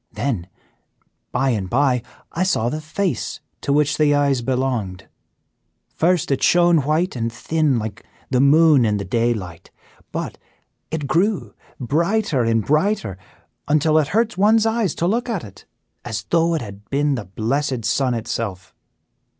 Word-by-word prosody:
Then, 110 -11 -2 0.8
by 135 0 +1
and 100 -5 -2
by, 130 0 +2 0.3
I 170 - -3
saw 120 -11 +1
the 155 +4 -4
face 175 +5 -2 0.2
to 140 - -1
which 150 +1 +2
the 145 -1 +4
eyes 140 -3 +2
belonged. 120 -7 -2 0.9
First, 170 -3 +1
it 135 - 0
shone 175 -2 +4
white 160 +4 0
and 115 -1 -2
thin 155 +2 0
like 110 -1 -5 0.3
the 125 - +3
moon 150 -1 +5
in 105 -2 +1
the 100 - -4
daylight; 115 -8 -2 0.4
but - - -5 0.5
it 160 -2 -3
grew 180 - 0 0.3
brighter 165 - +1
and 115 -2 +1
brighter, 150 - +1 0.5
until 155 +1 +3
it 150 - +1
hurt 215 +1 0
one's 220 +2 +4
eyes 225 -6 0
to 170 - -1
look 235 +7 0
at 220 -6 -2
it, 100 -3 -13 0.4
as 110 - -4
though 170 0 +3
it 155 - -2
had 100 -1 -11
been 145 +1 +1
the 120 -6 -4
blessed 120 +5 -2
sun 130 -3 +1
itself. 110 -4 -4
140 Hz, 150 wpm, -21 LUFS, 115-165 Hz, 0.9 s, moon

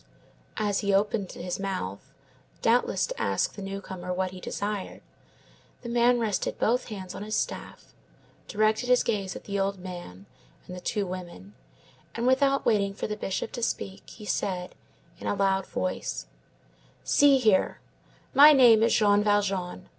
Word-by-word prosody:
As 205 -2 0
he 200 -1 0
opened 200 -1 0
his 180 +1 -5
mouth, 185 - -4 0.5
doubtless 235 +2 +2
to - - -6
ask - - 0
the 205 - -9
newcomer 190 -2 -6
what 185 0 -1
he 185 - -9
desired, 205 +1 -4 0.8
the 235 - -6
man 240 +1 +3
rested 215 -4 -1
both 245 +3 +1
hands 190 -4 -7
on - - -7
his 215 +1 -3
staff, - - -4 0.5
directed 215 +3 +1
his 250 0 +5
gaze 200 -5 -2
at - - -8
the 200 -1 -3
old 195 0 0
man 175 - -9 0.4
and 180 - -8
the 180 - -8
two 205 +1 -1
women, 175 - -8 0.6
and 235 - -2
without 275 +2 +3
waiting 200 -2 +2
for - - -4
the 210 - -3
Bishop 200 +1 -3
to 240 - -6
speak, 195 -4 -3
he 215 - -11
said, 180 -2 -2 0.5
in - - -6
a - - 0
loud 195 -1 +1
voice:— 185 - -3 0.8
"See 285 -1 +5
here. 215 -7 +2 0.5
My 295 +2 +9
name 240 -5 +7
is 230 +1 +3
Jean 205 -1 +4
Valjean. 200 -3 0
200 Hz, 160 wpm, -27 LUFS, 185-225 Hz, 0.8 s, My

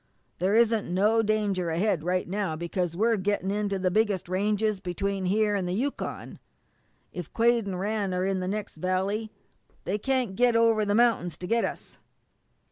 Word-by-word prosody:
There 190 +4 +2
isn't 225 -4 +2
no 210 +5 +3
danger 205 -5 0
ahead 175 0 0
right 180 +1 0
now, 195 -3 -2
because 170 +1 -3
we're 225 +2 +2
gettin' 195 0 -1
into 205 -1 -1
the 185 -1 0
biggest 210 -3 +1
ranges 205 +2 0
between 195 +1 -2
here 210 +3 +2
an' 190 -3 -1
the 180 - -1
Yukon. 275 +7 -4 0.7
If 175 -4 -7
Quade 235 -2 +2
and 185 -2 -3
Rann 205 0 -1
are 180 0 0
in 195 -1 0
the 185 - -3
next 205 -3 -4
valley 190 +5 -1 0.5
they 200 +4 -2
can't 255 -4 0
get 245 +1 +3
over 225 -2 +3
the 205 0 +1
mount'ins 220 -9 +2
to 180 - -7
get 230 +5 +1
at - - 0
us. - - -15
200 Hz, 180 wpm, -27 LUFS, 185-220 Hz, 0.7 s, no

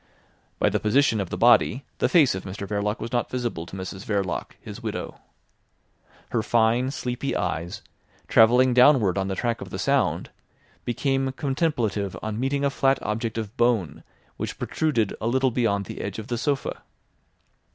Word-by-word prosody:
By - - +3
the - - 0
position 115 0 +2
of 95 - -4
the - - -4
body 120 +2 +4
the - - +2
face 155 -7 +5
of 95 - -5
Mr 100 +1 -6
Verloc 105 +1 -1
was 115 - -5
not 120 -2 0
visible 120 -10 -3
to 95 - -9
Mrs 95 +1 -6
Verloc, 100 -3 -2
his - - -9
widow. - - -5 1.1
Her 115 - +1
fine, 115 +3 +2
sleepy 130 0 -3
eyes, 90 -1 -3 0.4
travelling 125 +3 +5
downward 125 -6 +5
on 95 -1 -1
the 95 - -2
track 115 +3 -1
of - - -7
the - - -5
sound, - - 0 0.5
became 135 +2 0
contemplative 130 - -1
on 110 0 -3
meeting 140 +2 0
a 140 - +1
flat 135 -1 +2
object 110 +1 -2
of 110 0 -4
bone 100 - +1 0.3
which - - -4
protruded 120 -10 0
a 110 - -1
little 130 +2 +2
beyond 100 -5 0
the - - -7
edge 100 - -5
of 110 0 -7
the 120 - -1
sofa. 140 +1 -2
115 Hz, 170 wpm, -25 LUFS, 100-130 Hz, 1.1 s, face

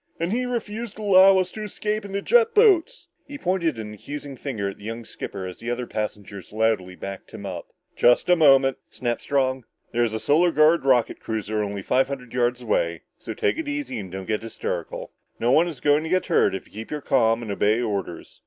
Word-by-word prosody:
"And 170 +2 -1
he 250 +1 0
refused 230 -2 -4
to 215 - -8
allow 195 -1 +7
us 185 -1 0
to 215 - -7
escape 210 0 -3
in 200 - -8
the 200 0 -3
jet 465 -1 +4
boats!" 425 +1 +4 0.2
He 285 - -7
pointed 175 - 0
an 105 -1 -6
accusing 145 +5 -7
finger 120 -7 -4
at 100 - -6
the - - -14
young 115 +2 -6
skipper 95 -3 -6
as 90 -1 -8
the 115 - -5
other 120 0 -2
passengers 105 -3 -6
loudly 105 -4 0
backed 100 +1 -8
him - - -8
up. - - -6 0.3
"Just 120 0 +4
a 180 - +6
moment," 135 -4 +5
snapped 120 -2 -3
Strong. 130 -2 0 0.3
"There's 120 -1 +1
a 110 - -2
Solar 165 +7 +3
Guard 155 0 +4
rocket 125 -3 +2
cruiser 110 -1 -3
only 100 -1 -4
five 130 +6 +2
hundred 130 -4 -7
yards 125 0 0
away, - - 0 0.2
so - - -7
take 425 -7 0
it 325 - -4
easy 290 - -3
and 95 -3 -8
don't 95 0 -6
get 110 +1 -1
hysterical. 115 0 -5 0.3
No 120 +2 +2
one 160 +6 +5
is 155 -7 -6
going 145 +1 +3
to 160 - -5
get 185 +1 +1
hurt 165 - +2
if - - -6
you 110 +2 -8
keep 150 +4 -6
calm 115 -3 +2
and 110 - -5
obey 105 +3 +2
orders!" 100 -7 -4
130 Hz, 220 wpm, -24 LUFS, -, 0.3 s, allow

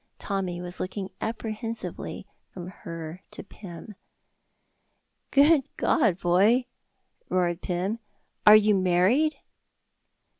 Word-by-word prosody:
Tommy 190 -3 -3
was 180 0 -6
looking 190 +1 -4
apprehensively 225 0 -5 0.3
from 180 -1 -8
her 165 -1 -8
to - - -8
Pym. 195 +1 -11 1.4
"Good 285 0 +4
God, 190 -6 +2
boy!" 200 +9 +3 0.6
roared 175 -1 0
Pym, 190 +5 -2 0.5
"are 210 - +11
you 215 0 +5
married?" 190 - +3
195 Hz, 90 wpm, -26 LUFS, 180-225 Hz, 1.4 s, are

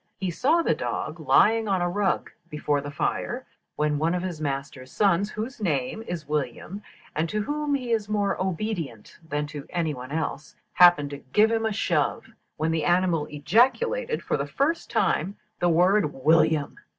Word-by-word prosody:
He 190 -2 -2
saw 325 - +2
the - - +2
dog - - -4
lying 225 0 +4
on 195 -2 +1
a 175 - +1
rug 190 +1 0 0.2
before 150 -2 -1
the 145 - -6
fire, 240 - -2 0.3
when 150 -1 0
one 165 +3 +1
of 180 - -2
his 175 -4 -5
master's 135 -2 -4
sons, 200 0 +2
whose 225 +4 -6
name 145 0 -1
is 165 -4 -5
William, 150 - -3 0.3
and 160 +2 0
to 210 0 -1
whom 295 +3 -1
he 250 -3 -3
is 215 -2 0
more 205 -2 +1
obedient 175 - -4
than 150 +1 -1
to 145 0 -8
any 170 -4 -1
one 130 0 -8
else, 150 -1 -4 0.2
happened 175 -5 +6
to 140 - -6
give 215 +2 +5
him 225 -1 +1
a - - -1
shove, 210 - 0 0.3
when 160 +1 0
the 160 -2 0
animal 175 -3 +2
ejaculated, 260 - +1
for - - 0
the - - -3
first 320 +5 -1
time, 195 +2 0 0.2
the 175 - +2
word 180 +1 +3
'William.' 155 +1 +2
175 Hz, 175 wpm, -25 LUFS, 150-215 Hz, 0.3 s, happened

